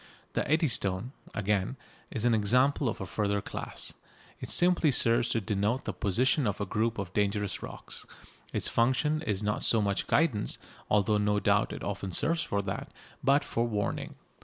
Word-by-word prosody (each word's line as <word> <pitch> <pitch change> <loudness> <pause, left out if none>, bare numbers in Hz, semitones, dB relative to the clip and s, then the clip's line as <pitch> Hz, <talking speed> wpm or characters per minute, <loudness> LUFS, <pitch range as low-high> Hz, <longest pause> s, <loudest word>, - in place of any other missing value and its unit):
The - - -1
Eddystone, 120 - +2 0.2
again, 105 +3 0 0.3
is 115 - -3
an 120 - +4
example 125 +5 +3
of - - -4
a - - -3
further 100 +2 0
class. - - -6 0.5
It - - -7
simply 175 -4 +4
serves 115 -1 +3
to 115 - 0
denote 105 +5 -1
the 110 - -2
position 120 - +2
of 100 - -2
a 100 - -1
group 110 +4 0
of 95 -2 -5
dangerous 105 -1 0
rocks. - - -6 0.4
Its - - -1
function 135 +6 +2
is 105 -9 -1
not 105 0 0
so 115 - +3
much 100 -2 0
guidance, 140 -10 +1 0.3
although 105 0 +3
no 105 0 +2
doubt - - +2
it - - -6
often 95 - -3
serves 165 - +2
for 100 -7 -1
that, 95 - -5 0.3
but 140 +2 +4
for 120 -3 -1
warning. 105 -3 -2
110 Hz, 170 wpm, -29 LUFS, 100-130 Hz, 0.5 s, an